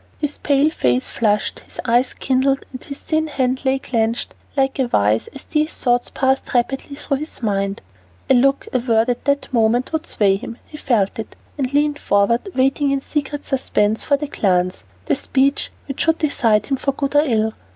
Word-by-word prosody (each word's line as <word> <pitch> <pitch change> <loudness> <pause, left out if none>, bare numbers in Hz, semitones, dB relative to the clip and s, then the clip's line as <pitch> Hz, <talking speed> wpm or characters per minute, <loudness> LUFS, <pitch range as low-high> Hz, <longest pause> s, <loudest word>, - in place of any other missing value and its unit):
His 295 -1 -3
pale 290 +2 +2
face 125 - +1
flushed, 210 -2 0
his - - -13
eye 240 +2 +4
kindled, 270 +1 +1
and 255 - -8
his 280 - -7
thin 315 +1 -1
hand 260 -3 -1
lay 265 0 +3
clenched 230 -3 -1 0.2
like 270 0 +1
a 260 - +2
vise 105 - +2
as 275 - -11
these 305 +1 0
thoughts 245 -1 +1
passed 265 -1 0
rapidly 270 +3 0
through 280 -1 -1
his 305 -3 -4
mind. 200 - -1 0.4
A - - +4
look, 275 +2 +3
a 255 - +3
word 230 -1 +2
at 245 - -2
that 280 -1 0
moment 235 +4 +2
would 320 +1 -2
sway 195 -2 +3
him; 230 +3 -8
he 300 - -11
felt 225 -5 0
it, 220 - -6 0.2
and 270 -3 -2
leaned 290 0 +1
forward, 205 - +1
waiting 270 +2 +2
in 275 0 +1
secret 290 0 -3
suspense 220 -5 0
for 280 - +2
the 295 - -3
glance, 185 - 0 0.2
the - - +1
speech 275 - +1 0.2
which 275 - -4
should 325 0 +2
decide 230 -8 +2
him 270 - -1
for 275 +1 -1
good 275 +1 -3
or 290 - +7
ill. 220 -6 +1
265 Hz, 195 wpm, -20 LUFS, 225-280 Hz, 0.4 s, or